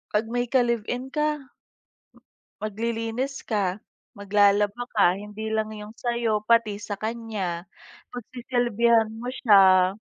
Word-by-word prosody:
pag 210 Hz, +2 st, +2 dB
may 245 Hz, 0 st, 0 dB
ka-live-in 245 Hz, +1 st, 0 dB
ka 300 Hz, -2 st, -2 dB, 1.1 s
maglilinis 230 Hz, +5 st, -3 dB
ka, 200 Hz, -3 st, -1 dB, 0.3 s
maglalaba 205 Hz, +1 st, +2 dB
ka, 185 Hz, -4 st, +4 dB
hindi 210 Hz, +2 st, -7 dB
lang 220 Hz, 0 st, -1 dB
yung 210 Hz, +2 st, -10 dB
sa'yo, 235 Hz, -3 st, -1 dB
pati 230 Hz, -2 st, +3 dB
sa 205 Hz, 0 st, -7 dB
kanya. 215 Hz, -6 st, -4 dB, 0.5 s
Pagsisilbihan 235 Hz, -2 st, +1 dB
mo 245 Hz, +3 st, -5 dB
siya. 190 Hz, -6 st, +5 dB
220 Hz, 105 wpm, -25 LUFS, 205-240 Hz, 1.1 s, siya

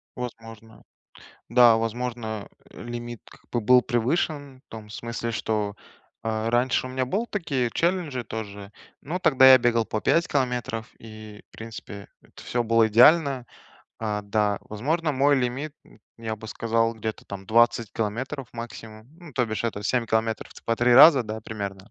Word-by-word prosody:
Возможно. 115 Hz, -2 st, -9 dB, 0.7 s
Да, 120 Hz, -1 st, +6 dB
возможно, 115 Hz, -2 st, -4 dB, 0.2 s
э, -, -, -12 dB
лимит, 120 Hz, -1 st, -7 dB
как -, -, -20 dB
бы, 120 Hz, -, 0 dB
был 125 Hz, +4 st, +5 dB
превышен 135 Hz, +3 st, -1 dB
в -, -, -72 dB
том 110 Hz, -2 st, -10 dB
смысле, 115 Hz, +1 st, -5 dB
что, 105 Hz, -2 st, -2 dB, 0.5 s
э, 110 Hz, 0 st, -1 dB
раньше 125 Hz, +2 st, +1 dB
у -, -, -9 dB
меня 130 Hz, 0 st, -1 dB
был 210 Hz, -, -2 dB
такие 140 Hz, -, -1 dB
челленджи 165 Hz, -8 st, -1 dB
тоже. 100 Hz, -3 st, -7 dB, 0.3 s
Ну, 170 Hz, +6 st, -4 dB
тогда 130 Hz, -6 st, +6 dB
я 130 Hz, -, +9 dB
бегал 115 Hz, -1 st, +2 dB
по 110 Hz, -, -3 dB
5 165 Hz, 0 st, +2 dB
километров, 125 Hz, -4 st, -2 dB
и, 110 Hz, -1 st, -12 dB
в -, -, -
принципе, 110 Hz, -3 st, -9 dB, 0.3 s
всё 120 Hz, -1 st, -2 dB
было 115 Hz, 0 st, +3 dB
идеально. 135 Hz, +3 st, +5 dB, 0.5 s
А, 105 Hz, -2 st, -3 dB
да. 105 Hz, 0 st, 0 dB
Возможно, 155 Hz, +10 st, -2 dB
мой 140 Hz, +2 st, +3 dB
лимит, 130 Hz, +4 st, -2 dB
м, -, -, -20 dB, 0.2 s
я 110 Hz, -1 st, -4 dB
бы 110 Hz, -, -10 dB
сказал, 115 Hz, +1 st, 0 dB
где-то 110 Hz, 0 st, -5 dB
там 95 Hz, -1 st, -9 dB
20 115 Hz, 0 st, +3 dB
километров 120 Hz, +5 st, -4 dB
максимум, 110 Hz, -1 st, -9 dB
ну 170 Hz, -4 st, -13 dB
то 125 Hz, -2 st, 0 dB
бишь 110 Hz, +1 st, -4 dB
это 105 Hz, -3 st, -3 dB
7 120 Hz, +3 st, 0 dB
километров 110 Hz, 0 st, -1 dB
в -, -, -24 dB
с -, -, -20 dB
по 115 Hz, -, -1 dB
3 120 Hz, +1 st, +3 dB
раза, 140 Hz, 0 st, +9 dB
да, 110 Hz, +1 st, -5 dB
примерно. 100 Hz, -3 st, -7 dB
115 Hz, 165 wpm, -25 LUFS, 110-130 Hz, 0.7 s, я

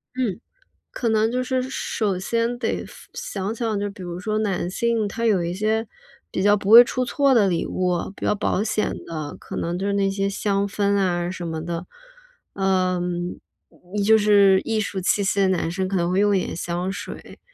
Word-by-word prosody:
嗯， 235 Hz, -6 st, -1 dB, 0.5 s
可 235 Hz, -, -1 dB
能 220 Hz, +1 st, +2 dB
就 255 Hz, 0 st, 0 dB
是 255 Hz, 0 st, 0 dB
首 210 Hz, -7 st, -1 dB
先 230 Hz, +5 st, -1 dB
得 235 Hz, -2 st, -2 dB
分 -, -, -15 dB
想 195 Hz, +2 st, -4 dB
想 225 Hz, -3 st, -1 dB
就 205 Hz, 0 st, -2 dB
比 200 Hz, -1 st, -11 dB
如 175 Hz, 0 st, -6 dB
说 215 Hz, +3 st, -2 dB
男 195 Hz, -5 st, -1 dB
性 230 Hz, +2 st, 0 dB
他 230 Hz, +3 st, -3 dB
有 195 Hz, -6 st, +3 dB
一 170 Hz, +1 st, -2 dB
些， 215 Hz, +3 st, 0 dB, 0.4 s
比 -, -, -2 dB
较 205 Hz, 0 st, +5 dB
不 200 Hz, -1 st, -3 dB
会 235 Hz, +2 st, +11 dB
出 255 Hz, +1 st, -2 dB
错 275 Hz, +2 st, +2 dB
的 220 Hz, -5 st, +4 dB
礼 175 Hz, -3 st, 0 dB
物， 180 Hz, -1 st, 0 dB, 0.2 s
比 -, -, -5 dB
较 -, -, +3 dB
保 205 Hz, 0 st, 0 dB
险 215 Hz, -1 st, 0 dB
的， 155 Hz, -3 st, -5 dB
可 -, -, -9 dB
能 175 Hz, +1 st, -2 dB
就 195 Hz, -, -3 dB
是 200 Hz, -, 0 dB
那 195 Hz, -1 st, +2 dB
些 195 Hz, 0 st, -1 dB
香 200 Hz, 0 st, 0 dB
氛 200 Hz, 0 st, 0 dB
啊 175 Hz, -3 st, 0 dB
什 180 Hz, -2 st, -6 dB
么 160 Hz, -1 st, -4 dB
的。 170 Hz, +1 st, -4 dB, 0.7 s
呃， 185 Hz, -2 st, +1 dB, 1.0 s
就 220 Hz, +1 st, +6 dB
是 200 Hz, -2 st, +5 dB
艺 225 Hz, -1 st, 0 dB
术 200 Hz, -2 st, -2 dB
气 200 Hz, +2 st, +2 dB
息 200 Hz, +1 st, 0 dB
的 195 Hz, -, +4 dB
男 175 Hz, -3 st, 0 dB
生 185 Hz, +1 st, -2 dB
可 195 Hz, -, -3 dB
能 170 Hz, 0 st, 0 dB
会 185 Hz, -, +2 dB
用 205 Hz, 0 st, +3 dB
一 -, -, +2 dB
点 -, -, -5 dB
香 175 Hz, +2 st, -3 dB
水。 195 Hz, -, -8 dB
200 Hz, 220 characters per minute, -23 LUFS, 185-220 Hz, 1.0 s, 会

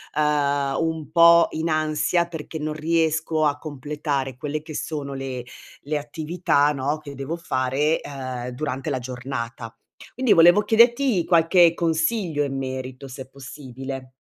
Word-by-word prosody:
ehm, 145 Hz, -2 st, +1 dB
un 160 Hz, -3 st, -2 dB
po' 170 Hz, 0 st, +7 dB
in 160 Hz, +1 st, -2 dB
ansia, 155 Hz, +2 st, +1 dB
perché, 160 Hz, -1 st, -7 dB
non 155 Hz, 0 st, -3 dB
riesco 160 Hz, 0 st, 0 dB
a 145 Hz, -1 st, +1 dB
completare 145 Hz, -3 st, -4 dB
quelle 150 Hz, +2 st, -4 dB
che 155 Hz, 0 st, -10 dB
sono 145 Hz, -3 st, -4 dB
le 130 Hz, -2 st, -5 dB, 0.4 s
le 150 Hz, +2 st, -2 dB
attività, 150 Hz, 0 st, 0 dB
no, 145 Hz, +3 st, -2 dB
che 145 Hz, -2 st, -10 dB
devo 135 Hz, +5 st, -4 dB
fare, 145 Hz, 0 st, 0 dB
ehm, 130 Hz, -3 st, -6 dB
durante 135 Hz, 0 st, -4 dB
la 130 Hz, -, -1 dB
giornata. 125 Hz, -2 st, -6 dB, 0.4 s
Quindi, 255 Hz, -2 st, 0 dB
volevo 175 Hz, +4 st, +7 dB
chiederti 235 Hz, -2 st, +3 dB
qualche 170 Hz, 0 st, +5 dB
consiglio 165 Hz, -1 st, 0 dB
in 135 Hz, -1 st, -4 dB
merito, 130 Hz, 0 st, -5 dB
se 130 Hz, +1 st, -7 dB
è -, -, -22 dB
possibile. 135 Hz, -1 st, -8 dB
150 Hz, 145 wpm, -23 LUFS, 135-165 Hz, 0.4 s, po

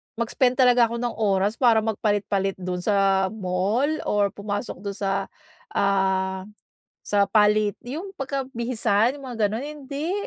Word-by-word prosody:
mag-spend 245 Hz, +2 st, +1 dB
talaga 245 Hz, -2 st, +5 dB
ako 235 Hz, -, -5 dB
ng 240 Hz, -1 st, -1 dB
oras 205 Hz, 0 st, +1 dB
para 230 Hz, -4 st, +4 dB
magpalit-palit 205 Hz, -3 st, 0 dB
do'n 180 Hz, -1 st, -4 dB
sa 195 Hz, -2 st, +3 dB
mall 205 Hz, +7 st, 0 dB, 0.2 s
or 205 Hz, -1 st, +2 dB
pumasok 205 Hz, +2 st, -5 dB
do'n 200 Hz, 0 st, -5 dB
sa, 195 Hz, -1 st, -1 dB, 0.5 s
ah, 190 Hz, -1 st, +1 dB, 0.6 s
sa 200 Hz, -1 st, +3 dB
palit 210 Hz, 0 st, +3 dB, 0.2 s
yung 340 Hz, +9 st, -5 dB
pagka 270 Hz, 0 st, -2 dB
bihisan 235 Hz, 0 st, +1 dB
yung 275 Hz, -, -11 dB
mga 215 Hz, -3 st, +1 dB
gano'n, 225 Hz, +6 st, -4 dB
hindi. 295 Hz, +3 st, -5 dB
210 Hz, 140 wpm, -24 LUFS, 195-245 Hz, 0.6 s, talaga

